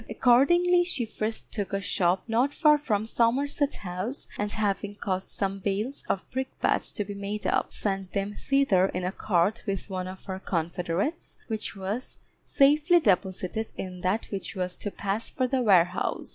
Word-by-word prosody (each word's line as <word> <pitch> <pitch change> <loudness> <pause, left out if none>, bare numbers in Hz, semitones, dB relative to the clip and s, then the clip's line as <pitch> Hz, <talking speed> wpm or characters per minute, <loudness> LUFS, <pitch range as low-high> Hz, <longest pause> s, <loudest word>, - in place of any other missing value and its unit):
Accordingly 345 +11 +4
she 345 -9 -2
first 220 0 -4
took 200 -3 -3
a 195 - +1
shop 185 -1 +1
not 245 +5 +1
far 300 -3 +5
from 215 -7 0
Somerset 275 +6 +1
House, 185 +8 -5
and 205 0 -2
having 205 -1 -1
caused 190 -2 -2
some 195 0 -2
bales 210 +8 -2
of 190 - -1
brick 260 +1 -4
bats - - +1
to 205 - -2
be 205 - -6
made 200 +1 -4
up, - - +1
sent 195 -2 -3
them 200 +1 -1
thither 240 -8 +3
in 180 -1 -4
a 180 - -1
cart 195 +2 +1
with 195 0 -3
one 185 -1 -3
of 185 0 -9
her 190 -1 -4
confederates, 175 - -2
which 220 -2 -3
was 200 +6 -4 0.3
safely 300 +5 +5
deposited 190 - 0
in 180 -1 -6
that 190 +5 0
which 195 -1 -4
was 180 -1 -2
to 205 - -3
pass 200 +2 -3
for 255 - 0
the 260 0 +1
warehouse. 180 -5 +2
205 Hz, 175 wpm, -27 LUFS, 190-250 Hz, 0.3 s, far